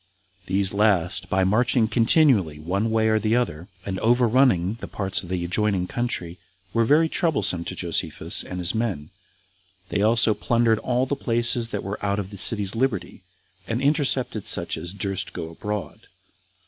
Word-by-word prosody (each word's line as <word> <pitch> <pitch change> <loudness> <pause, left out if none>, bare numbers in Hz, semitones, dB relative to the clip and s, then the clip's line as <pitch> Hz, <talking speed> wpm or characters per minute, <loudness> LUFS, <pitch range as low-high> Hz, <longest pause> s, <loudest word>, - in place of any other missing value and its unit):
These 95 0 0
last, 90 -4 +1
by 95 0 +1
marching 110 +3 +2
continually 115 - +3
one 95 +8 -2
way 110 0 +1
or 110 - +3 0.2
other, 85 -8 -3 0.2
and 95 -1 -4
overrunning 115 -4 +2
the - - -6
parts 95 -2 -2
of 90 - -11
the 90 -2 -2
adjoining 95 0 0
country, 90 -6 -3 0.3
were 115 0 +2
very 155 +6 +4
troublesome 105 - 0
to - - -5
Josephus - - 0
and 90 - -7
his 90 0 +1
men; 110 -10 -3 0.8
they 100 - -1
also 115 +1 +4
plundered 115 0 +1
all 125 +2 0
the 140 - -2
places 120 -2 0
that 105 - -4
were 100 +2 -6
out 100 0 0
of 100 -1 -5
the 100 - -9
city's 100 0 +3
liberty, 115 -5 -2 0.5
and 115 +1 -2
intercepted 135 -6 0
such - - +2
as 85 - -6
durst 95 -1 -3
go 80 - -6
abroad. 100 -2 -6
105 Hz, 160 wpm, -23 LUFS, 95-120 Hz, 0.8 s, very